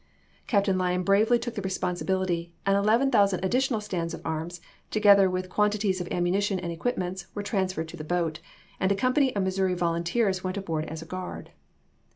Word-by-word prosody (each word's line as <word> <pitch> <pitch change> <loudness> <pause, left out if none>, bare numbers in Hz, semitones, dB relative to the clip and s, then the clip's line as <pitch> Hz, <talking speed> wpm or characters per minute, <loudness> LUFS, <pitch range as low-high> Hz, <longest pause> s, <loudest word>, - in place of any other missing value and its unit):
Captain' 200 -3 +2
Lyon 180 0 0
bravely 215 +5 +4
took 240 0 -5
the 205 - -4
responsibility, 185 -2 -1
and 195 0 +3
11,000 205 -2 +3
ad 190 - -1
ditional 255 -2 +1
stands 170 -5 -3
of 165 - -11
arms, 160 +2 -3 0.3
together 200 -2 +6
with 185 0 -2
quantities 205 -1 +1
of 175 - -5
ammunition 190 +3 +1
and 175 -1 -4
equipments, 180 -1 -3
were 205 - -3
transferred 190 -5 -1
to 175 - -10
the 155 - -6
boat, 165 -1 -1 0.4
and 190 0 +2
a - - +3
company 255 +6 +2
of 200 - +1
Missouii 190 -1 0
volunteers 175 +4 0
went 185 +1 -3
aboard 165 -5 -2
as 160 +1 -6
a - - -12
guard. 185 +2 -7
190 Hz, 180 wpm, -27 LUFS, 175-205 Hz, 0.4 s, together